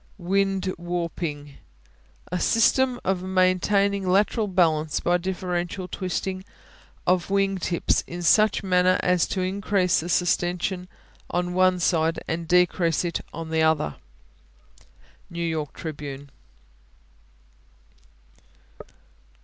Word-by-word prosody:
Wing 195 +1 0 0.2
Warping 170 -4 -4 0.7
A 180 - -1
system 245 +4 +2
of 185 -1 0
maintaining 190 +1 +1
lateral 210 +3 +2
balance 160 -5 +1
by 175 +1 +1
differential 180 0 -3
twisting 185 0 -3 0.6
of 180 0 +1
wing 195 -1 +1
tips 170 -1 0
in 175 +1 -6
such 215 +5 +4
manner 185 -1 +3
as 180 -2 +2
to 190 - -2
increase 185 -1 +1
the 165 - -5
sustension 180 +1 0 0.4
on 180 0 -1
one 185 0 +3
side 165 -1 +1
and 165 0 -3
decrease 175 -1 +2
it 170 - -2
on 165 -1 -7
the 160 0 +1
other. 160 - +1 1.3
New 170 0 -4
York 155 -3 -2
Tribune. 145 -3 -7
180 Hz, 105 wpm, -24 LUFS, 170-190 Hz, 1.3 s, such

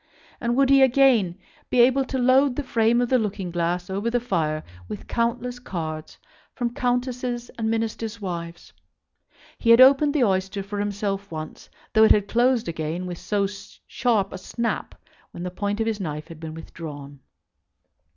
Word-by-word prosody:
And 235 0 0
would 275 0 +4
he 275 0 +7
again 250 -9 +4 0.3
be 250 - +1
able 260 +3 +4
to 265 - -3
load 260 +1 +4
the 295 - -2
frame 235 -1 +2
of 245 - 0
the 255 - +4
looking 200 -4 -3
glass 175 +1 -1
over 200 +4 -2
the 245 +1 +1
fire 155 -10 -1 0.2
with 105 - -7
countless 240 +1 -1
cards 160 -8 -6 0.4
from 240 -2 -2
Countesses 245 -1 -2
and 220 -1 -2
Ministers' 225 0 -2
wives? 170 -3 -6 0.9
He 230 - 0
had 230 +1 +8
opened 280 +3 +6
the 280 - +3
oyster 195 -1 0
for 200 +1 -5
himself 200 -1 -2
once, 155 -1 -7 0.2
though 220 - +6
it - - +6
had 205 -1 +3
closed 240 0 +2
again 165 +2 -3
with 175 -2 -6
so 205 -1 0
sharp 200 +1 -2
a 190 - -6
snap 230 +5 -3 0.3
when 175 - -8
the 180 - -4
point 205 +3 -2
of 225 - +1
his 220 -2 -1
knife 150 -4 -5
had 165 -2 -10
been 160 -1 -7
withdrawn. 145 -4 -9
215 Hz, 170 wpm, -24 LUFS, 180-245 Hz, 0.9 s, had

